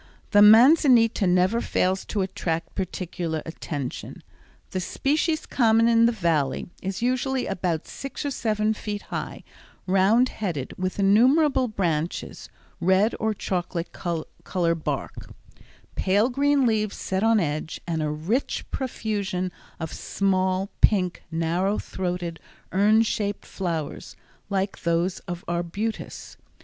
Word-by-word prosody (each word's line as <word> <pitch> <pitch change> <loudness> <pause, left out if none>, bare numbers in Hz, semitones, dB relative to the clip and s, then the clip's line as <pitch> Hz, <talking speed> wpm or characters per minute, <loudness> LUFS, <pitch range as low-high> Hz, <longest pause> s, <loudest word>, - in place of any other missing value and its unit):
The 205 - +6
manzanita 230 - +6
never 185 +6 +3
fails 190 -3 0
to 205 - -2
attract 165 -3 -3
particular 175 -3 -3
attention. 145 -5 -6 0.5
The 185 - -2
species 305 - 0
common 230 -2 +3
in 230 0 +5
the - - +3
Valley 165 - 0
is 195 +4 -4
usually 255 +1 0
about 175 -4 -2
six 275 +1 -6
or 285 - -1
seven 215 -3 0
feet 210 -1 -5
high, - - -4 0.4
round 195 +7 +4
headed 170 -11 -4
with 185 0 -3
innumerable 255 +8 +4
branches, 170 -6 -2 0.3
red 190 +5 +3
or 220 -1 0
chocolate 175 -3 -3
color 170 0 -2
bark, 165 -2 -4 0.6
pale 205 +5 +2
green 280 +1 +2
leaves 215 -3 0
set 190 0 -2
on 225 0 +4
edge, 155 -2 -2
and 165 -2 -2
a 150 - 0
rich 165 - -2
profusion 205 -8 -2 0.3
of 160 -2 -5
small, 190 0 0
pink, 185 -4 +3
narrow 170 +5 0
throated, 175 -3 -4 0.3
urn 210 +4 +4
shaped 205 -2 -2
flowers, 165 -6 -4 0.3
like 195 0 -2
those 170 +2 0
of 175 -1 -6
arbutus. 175 +6 -4
195 Hz, 120 wpm, -25 LUFS, 175-225 Hz, 0.6 s, The